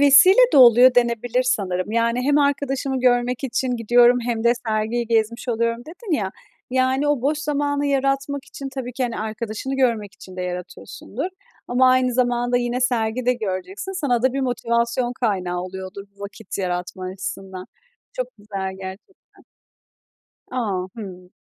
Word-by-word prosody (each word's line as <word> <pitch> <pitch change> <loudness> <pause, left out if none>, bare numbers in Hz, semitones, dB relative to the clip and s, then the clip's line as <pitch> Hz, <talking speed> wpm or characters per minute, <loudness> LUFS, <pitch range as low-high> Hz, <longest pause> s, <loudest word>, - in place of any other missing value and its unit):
vesile 285 +7 +7 0.2
de - - +4
oluyor 250 0 +8
denebilir 240 +1 +2
sanırım. 200 -5 -1
Yani, 235 +2 +1
"Hem 290 +2 +3
arkadaşımı 275 -2 0
görmek 245 +1 +2
için 260 0 -1
gidiyorum 240 +2 +5
hem 235 -1 -2
de 235 - +6 0.2
sergiyi 220 +2 0
gezmiş 230 +2 0
oluyorum" 230 0 0
dedin 360 +4 -7
ya. 195 -3 -2 0.4
Yani, 260 +3 +1
o 290 -4 +1
boş 295 +2 +1
zamanı 285 -1 -1
yaratmak 275 0 0
için 275 -1 -8
tabii 250 -2 -5
ki, 260 - -3
hani, 240 -2 -2
arkadaşını 220 +4 -4
görmek 225 -6 0
için 185 -3 -13
de 180 - -3
yaratıyorsundur. 180 - -6 0.4
Ama 255 +1 +4
aynı 255 -1 +2
zamanda 245 0 +1
yine 245 +1 -1
sergi 240 -1 0
de 250 - +5
göreceksin. 225 - -4
Sana 255 -10 0
da 260 -1 +3
bir 275 - -1
motivasyon 240 0 0
kaynağı 185 -6 0
oluyordur 190 +2 -7
bu 200 - -22
vakit 200 +1 -7
yaratma 180 0 -3
açısından. 190 0 -6 0.5
Çok 255 - -3
güzel 195 -2 -5
gerçekten. 190 - -12 1.1
A! 205 -8 -2
Hıı. 185 -4 -9
240 Hz, 150 wpm, -22 LUFS, 210-260 Hz, 1.1 s, oluyor